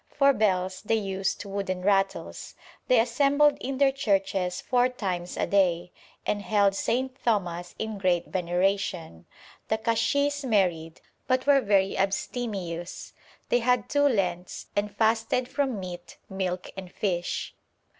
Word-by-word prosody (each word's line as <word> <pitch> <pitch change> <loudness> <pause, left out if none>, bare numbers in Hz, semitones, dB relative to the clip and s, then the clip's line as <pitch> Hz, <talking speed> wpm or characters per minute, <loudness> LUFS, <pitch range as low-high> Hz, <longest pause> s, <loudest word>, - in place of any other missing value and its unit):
For 280 -1 +4
bells 185 -4 0
they 225 +2 +1
used 195 -1 -2
wooden 195 -2 -3
rattles. 195 0 0 0.3
They 250 -2 +5
assembled 280 +5 +3
in 265 +1 -3
their 275 0 +4
churches 195 -7 0
four 250 0 +2
times 185 -8 -4
a - - +1
day, 180 -2 +1 0.3
and 205 - 0
held 200 -1 +3
St. 255 +6 -1
Thomas 175 -6 -1
in 220 -2 -4
great 180 -3 +1
veneration. 180 - -1 0.4
The 220 - +1
kashis 255 +6 +1
married, 180 -9 0 0.3
but 255 -1 +1
were 280 -1 +5
very 195 -3 +2
abstemious. 195 -3 -3 0.4
They 245 - +3
had 245 -2 +1
two 285 0 +3
Lents, 180 -7 -1
and 205 +1 0
fasted 225 +2 +1
from 265 -6 -1
meat, 175 -2 -8
milk, 185 -1 -3
and 185 -2 -8
fish.' 175 -4 -2
200 Hz, 135 wpm, -27 LUFS, 180-245 Hz, 0.4 s, They